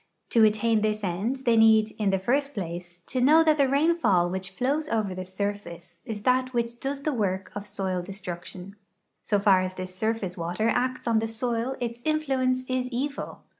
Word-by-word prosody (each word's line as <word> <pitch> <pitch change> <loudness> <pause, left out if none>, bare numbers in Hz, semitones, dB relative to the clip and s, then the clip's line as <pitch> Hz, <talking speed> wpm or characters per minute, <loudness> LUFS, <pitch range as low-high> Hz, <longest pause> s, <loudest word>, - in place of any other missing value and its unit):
To 230 - +4
attain 215 +1 +3
this 215 0 -1
end 210 +9 -2
they 235 -1 +4
need, 220 -1 +5
in 210 -2 +2
the 195 - +2
first 275 +8 0
place, 175 -2 -6
to 255 - -2
know 310 +5 +6
that 310 -2 +3
the 275 -2 +4
rainfall 270 - +3
which 190 0 -5
Hows 290 +5 0
over 215 -4 0
the 185 0 -5
surface 185 -3 -5
is 210 -2 -5
that 255 +1 +2
which 235 0 -1
does 275 +2 -4
the 305 - 0
work 195 -5 -2
of 205 0 -6
soil 190 -2 -2
destruction; 185 0 -8 0.5
so 210 - +1
far 195 -2 +4
as 185 0 -3
this 185 0 -6
surface 200 -2 -2
water 175 +7 -1
acts 255 +1 -1
on 230 -1 +3
the 225 - -1
soil 235 +3 -2
its 235 0 -4
inti 310 +3 0
Lienee 255 -1 +1
is 255 -1 -1
evil. 275 +3 -4
220 Hz, 195 wpm, -26 LUFS, 190-255 Hz, 0.5 s, know